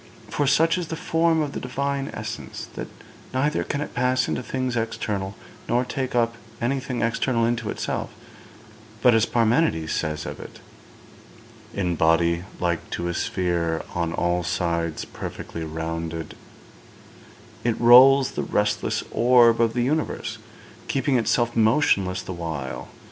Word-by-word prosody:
For 145 - 0
such 165 +5 +3
is 175 - -4
the 160 - -4
form 165 0 +2
of 145 - -4
the - - -4
Divine 140 +2 -2
essence, - - -6
that - - -5 0.5
neither 145 +3 +1
can 145 - -3
it - - -5
pass 125 0 +1
into - - -2
things 130 0 -2
external, 105 -4 -2 0.3
nor 120 +1 +2
take 130 -1 -3
up 115 -1 +1 0.2
anything 130 0 -1
external 115 +1 +1
into 115 -2 -1
itself; - - -3 0.9
but, 125 - +7
as 115 -1 +3
Parmenides 115 - +2
says 75 -1 -2
of - - -6
it, - - -10 1.2
'"In 90 -4 0
body 85 +2 +2
like 85 -2 -1
to 85 0 -3
a - - -2
sphere 85 -3 -1
on 85 -1 -1
all 85 +1 0
sides 85 -2 -1
perfectly 85 - -7
rounded," 80 0 -4 1.3
it 120 -2 0
rolls 130 +3 +7
the - - -3
restless 105 0 0
orb 120 -1 +5
of 115 -1 +2
the 120 - +2
universe, 155 +5 -2 0.5
keeping 135 0 +1
itself 120 +1 +1
motionless 110 -6 +2
the 95 - -6
while. 80 -6 -5
115 Hz, 140 wpm, -24 LUFS, 85-130 Hz, 1.3 s, but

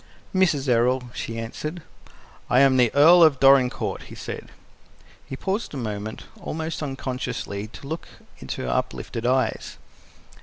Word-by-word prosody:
"Mrs. 165 -8 +2
Errol," 125 +1 +2
she 115 - -5
answered. 150 +9 -5 0.7
"I 125 - +5
am 135 -1 +5
the 120 -3 +4
Earl 165 +5 +8
of 155 -5 +6
Dorincourt," 135 -2 +4
he - - -11
said. - - -7 0.8
He - - -5
paused 195 - -3
a - - -4
moment, 110 -3 -5 0.2
almost 160 +1 -4
unconsciously, 125 -7 -4
to 125 +5 -12
look 160 +3 -5 0.3
into 65 - -5
her 60 - -3
uplifted 115 - -2
eyes. 130 -3 0
130 Hz, 140 wpm, -24 LUFS, 115-150 Hz, 0.8 s, Earl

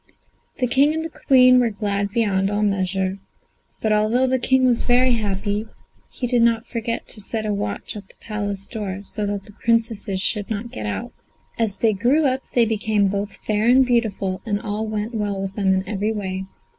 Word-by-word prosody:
The 255 - +1
King 275 +5 +3
and 320 0 -4
Queen 255 -2 +7
were 240 -2 +3
glad 200 -1 -2
beyond 200 -3 +1
all 205 +1 0
measure; 190 -1 0 0.6
but 215 -1 +3
although 215 +5 +3
the 260 0 +1
King 260 +1 +3
was 245 -2 +3
very 250 +1 +3
happy, 210 -1 -1 0.4
he 250 - -4
did 245 -1 +2
not 230 0 +3
forget 230 0 -3
to 215 - -6
set 220 +2 -3
a 210 - 0
watch 205 +1 -4
at 205 -2 -8
the - - -20
Palace 205 -3 -4
door, 200 -3 -5
so 210 +1 -4
that 200 -1 -3
the - - -14
Princesses 225 -3 0
should 205 +1 -1
not 225 +2 -4
get 105 - -5
out. 100 -2 -4 0.5
As 220 -4 +1
they 225 -2 +2
grew 250 +10 +2
up 265 0 +1
they 240 -2 +5
became 215 -2 +1
both 200 +1 -3
fair 215 +1 +1
and 260 +2 +6
beautiful, 205 -6 0
and 205 -3 -1
all 215 +1 -3
went 215 +2 -3
well 205 -3 -2
with 195 0 -4
them 195 -2 +1
in 190 0 0
every 210 +1 -1
way. 190 -3 -3
215 Hz, 195 wpm, -22 LUFS, 200-235 Hz, 0.6 s, Queen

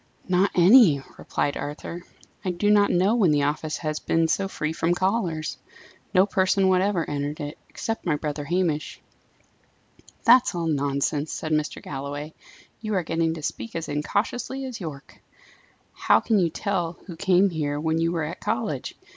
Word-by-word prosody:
"Not 185 +2 +3
any," 180 - +7 0.2
replied 145 - -1
Arthur. 150 +4 -6 0.4
"I 185 - -1
do 195 +4 +1
not 205 -1 +5
know 190 +5 +3
when 215 -7 +3
the 145 -1 +2
office 155 +2 -1
has 155 -2 -3
been 165 0 +1
so 195 +4 0
free 155 -4 -3
from 165 +2 +1
callers. 185 -5 -1 0.5
No 190 -1 +5
person 190 -1 +2
whatever 185 -2 +2
entered 145 +1 -3
it, 145 0 -6
except 225 0 -4
my 155 - +2
brother 150 0 -4
Hamish." 170 -2 -1 1.2
"That's 240 -4 +5
all 170 -1 -2
nonsense," 145 0 0
said 155 - -4
Mr. 155 -1 -1
Galloway. 145 +2 -6 0.5
"You 215 -2 -2
are 185 - +1
getting 165 0 0
to 155 - -8
speak 230 - -5
as 165 -1 -3
incautiously 230 - -2
as 245 -5 -7
Yorke. 150 -5 -8 0.7
How - - +3
can 220 -3 +1
you 175 -3 +2
tell 175 -2 -2
who 175 - -8
came 190 +2 +3
here 145 -3 -2
when 160 +1 0
you 165 0 +1
were 165 -2 -1
at 150 - -5
college? - - -3
165 Hz, 165 wpm, -25 LUFS, 150-195 Hz, 1.2 s, any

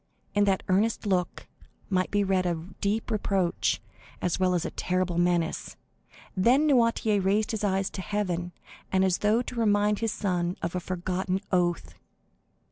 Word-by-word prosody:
In 205 0 +3
that 195 -2 +1
earnest 210 +4 +1
look 185 -3 -1 0.4
might 185 -2 0
be 205 0 +1
read 190 -2 +1
a 175 - +1
deep 200 +6 -3
reproach, 195 -4 0 0.4
as 180 0 -1
well 185 -1 +2
as 170 - -1
a - - -3
terrible 180 -1 -1
menace. 175 -2 0 0.6
Then 245 +10 +4
Noirtier 230 -7 +3
raised 205 +3 +1
his 220 -2 -3
eyes 195 -1 0
to 190 - -5
heaven, 180 -4 -2 0.4
as 190 -1 +2
though 215 +4 +2
to - - -7
remind 210 -3 +2
his 225 -1 0
son 180 -4 -1
of 170 - -2
a 180 - -1
forgotten 185 +1 -2
oath. 175 -2 0
190 Hz, 155 wpm, -27 LUFS, 180-210 Hz, 0.6 s, Then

